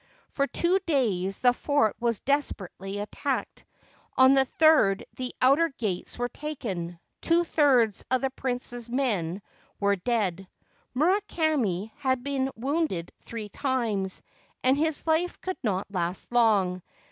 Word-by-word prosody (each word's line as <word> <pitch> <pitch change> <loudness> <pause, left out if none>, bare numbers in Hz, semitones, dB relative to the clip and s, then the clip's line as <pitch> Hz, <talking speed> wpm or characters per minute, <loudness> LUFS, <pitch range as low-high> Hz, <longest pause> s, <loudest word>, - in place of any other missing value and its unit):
For 280 -1 0
two 355 +6 +2
days 195 - 0
the 245 -1 +5
fort 250 -5 +1
was 230 -3 0
desperately 200 -8 -2
attacked; 205 +1 -3 0.5
on 260 +1 +7
the 270 -1 +4
third 295 -11 +4
the 255 -1 -4
outer 285 +6 +5
gates 210 - -4
were 245 0 0
taken; 210 - -5 0.2
two 340 +1 +3
thirds 260 - +3
of 255 0 +2
the 270 -1 0
prince's 245 -2 -4
men 205 -8 -1 0.4
were 200 0 +3
dead. 195 -3 -1 0.5
Murakami 305 - +1
had 260 -2 0
been 270 -1 -1
wounded 265 - -1
three 220 -3 -7
times, 220 -7 -1 0.4
and 260 +1 +4
his 315 +1 -1
life 325 +2 +1
could 375 0 -4
not 195 -5 -1
last 180 +1 -3
long. 205 -7 +3
245 Hz, 130 wpm, -27 LUFS, 200-280 Hz, 0.5 s, on